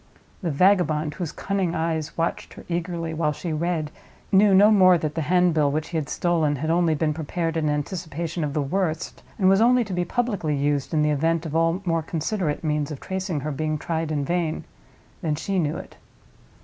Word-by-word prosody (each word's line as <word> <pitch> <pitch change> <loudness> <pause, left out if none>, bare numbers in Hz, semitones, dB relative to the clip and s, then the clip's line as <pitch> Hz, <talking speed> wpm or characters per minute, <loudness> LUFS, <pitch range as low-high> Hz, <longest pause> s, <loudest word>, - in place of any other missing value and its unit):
The 175 - -1
vagabond, 155 -2 +2
whose 175 -5 -4
cunning 195 -3 -2
eyes 160 -2 -2
watched 165 0 -2
her - - -12
eagerly 170 -1 -3
while 155 -1 0
she 165 +2 -4
read, 155 -1 -1 0.4
knew 200 0 +5
no 205 +3 +7
more 185 -4 +6
that 155 -2 -3
the 165 - -2
handbill 165 -3 +3
which 155 +2 -2
he 170 - -2
had 150 -3 -3
stolen 165 -4 +1
had 155 +4 -2
only 170 -2 +2
been 155 0 0
prepared 165 +2 -3
in 155 -2 +1
anticipation 160 +2 -3
of 145 0 -3
the 150 - +1
worst, 160 +2 -2 0.2
and 190 -4 +3
was 195 +2 +5
only 245 +1 +5
to 200 -4 -6
be 180 0 0
publicly 200 -7 -1
used 145 0 0
in 155 -2 +2
the 150 - +2
event 165 +3 +1
of 160 -1 -4
all 165 +3 +1
more 165 -2 +1
considerate 160 0 -2
means 150 -2 0
of 150 -3 -6
tracing 190 -5 -3
her 155 +2 -3
being 155 +2 -2
tried 160 0 -3
in 145 -2 -1
vain—than 155 - -4
she 190 +5 -1
knew 155 -1 -1
it. - - -10
165 Hz, 200 wpm, -24 LUFS, 150-180 Hz, 0.4 s, no